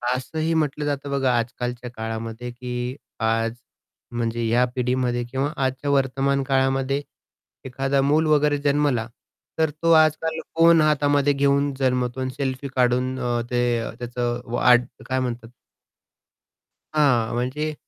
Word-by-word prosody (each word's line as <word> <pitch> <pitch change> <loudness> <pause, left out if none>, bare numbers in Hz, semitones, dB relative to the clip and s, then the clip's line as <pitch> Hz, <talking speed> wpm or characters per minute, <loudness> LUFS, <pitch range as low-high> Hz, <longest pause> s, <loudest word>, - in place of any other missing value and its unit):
असंही 155 +5 -2
म्हटलं 150 -2 0
जातं 145 -1 -3
बघा 135 -2 +1
आजकालच्या 125 +1 -3
काळामध्ये, 115 +1 -5
की 125 +1 -5 0.2
आज 115 +1 +1 0.6
म्हणजे 120 -1 -2
या 120 +2 +3
पिढीमध्ये 125 -1 0
किंवा 135 +2 -1
आजच्या 135 +1 -1
वर्तमान 135 0 +1
काळामध्ये, 135 +1 +1 0.6
एखादा 135 +1 0
मूल 150 +4 +3
वगैरे 150 -1 +3
जन्मला 140 -5 +1 0.5
तर 160 -1 +3
तो 165 - +4
आजकाल 160 0 +3 0.2
फोन 165 0 +6
हातामध्ये 145 -1 +3
घेऊन 140 0 +2
जन्मतो 125 -1 0
आणि 130 - -1
सेल्फी 135 -1 -2
काढून 125 +1 +1
अ, 120 -1 -1
ते 120 -2 0
त्याचं 120 0 -3
वाढ 125 0 +5 0.3
काय 130 0 0
म्हणतात? 120 -2 -4 1.5
हां 130 -7 +3
म्हणजे 140 +6 -2
130 Hz, 125 wpm, -23 LUFS, 120-145 Hz, 1.5 s, फोन